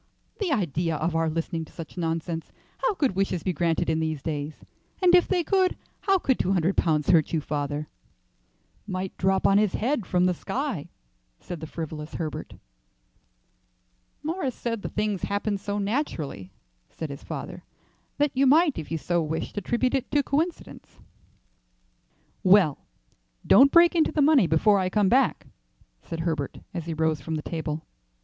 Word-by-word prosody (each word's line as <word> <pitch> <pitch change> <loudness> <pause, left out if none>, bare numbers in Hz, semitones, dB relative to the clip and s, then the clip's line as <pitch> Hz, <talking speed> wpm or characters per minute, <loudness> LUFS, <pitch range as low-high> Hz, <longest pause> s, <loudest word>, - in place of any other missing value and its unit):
"The 395 -6 -1
idea 170 - 0
of 160 +2 -1
our 165 0 +2
listening 165 +1 -2
to - - -19
such 165 -3 -9
nonsense! 165 -1 -3 0.3
How 485 -5 +1
could 275 - 0
wishes 190 -3 0
be 185 - 0
granted 165 0 0
in 160 0 +1
these 155 -3 -2
days? 150 -1 -4 0.3
And 360 -2 +4
if 360 -1 +6
they 360 -2 +1
could, 375 +2 +2 0.2
how 390 -1 +3
could 265 -8 0
two 190 - +1
hundred 180 +1 +1
pounds 155 0 +2
hurt 165 -3 +3
you, 160 - +2
father?" 145 0 -3 1.0
"Might 185 -1 -4
drop 190 +1 +2
on 200 +1 +5
his 210 -3 +1
head 235 -3 -1
from 180 0 +2
the 180 - +3
sky," 245 - -4 0.5
said 175 - -7
the 160 - -7
frivolous 155 -1 -6
Herbert. 155 -4 -5 1.7
"Morris 310 -5 -2
said 230 -3 -3
the - - -4
things 210 -3 -1
happened 205 0 -1
so 205 +1 -3
naturally," 195 - -3 0.4
said 160 -3 -6
his 140 - -9
father, - - -7 0.5
"that 290 -1 +2
you 270 +1 +3
might 305 - +4
if 155 - -7
you 165 - -1
so 175 +2 0
wished 160 +1 -3
attribute 240 +5 0
it 265 -2 -1
to 290 -1 +2
coincidence." 320 +6 -3 1.5
"Well, 185 -6 +5 0.7
don't 275 +2 +7
break 340 0 +6
into 325 -3 +2
the 305 -2 +2
money 280 - +5
before 195 +6 +4
I 185 -1 0
come 200 0 +2
back," 260 +3 +2 0.6
said 165 -1 -5
Herbert 160 -4 -2 0.2
as 170 -3 -5
he 165 - -3
rose 160 -1 0
from 160 - -3
the 155 - -4
table. 160 -1 -4
185 Hz, 170 wpm, -26 LUFS, 160-260 Hz, 1.7 s, don't